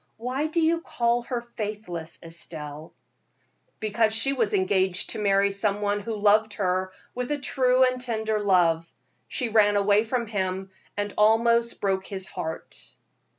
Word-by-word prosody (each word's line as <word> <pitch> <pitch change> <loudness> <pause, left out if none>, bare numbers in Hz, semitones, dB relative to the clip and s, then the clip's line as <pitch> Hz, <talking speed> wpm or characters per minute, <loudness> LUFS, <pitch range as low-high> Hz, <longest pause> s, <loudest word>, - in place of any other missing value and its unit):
"Why 255 +6 -2
do 315 +2 -1
you 330 +1 +2
call 235 -5 0
her 245 -2 -1
faithless, 210 -8 -6
Estelle?" 155 -2 -7 0.9
"Because 215 +1 +1
she 270 +5 +2
was 230 -6 +1
engaged 185 -1 +1
to - - -4
marry 200 0 +3
some 200 0 +1
one 205 0 0
who 220 +2 -4
loved 210 +1 +3
her 185 -1 0 0.2
with 250 0 -3
a 295 - +1
true 260 -2 +2
and 255 -1 +1
tender 220 -3 -1
love. 170 -5 +2 0.4
She 250 -3 -2
ran 210 -2 +4
away 205 +1 +4
from 235 +1 -1
him, 190 -2 -3 0.3
and 205 0 -2
almost 230 +2 +3
broke 190 -1 0
his 190 -2 -5
heart." 160 -3 -6
210 Hz, 150 wpm, -26 LUFS, 190-235 Hz, 0.9 s, ran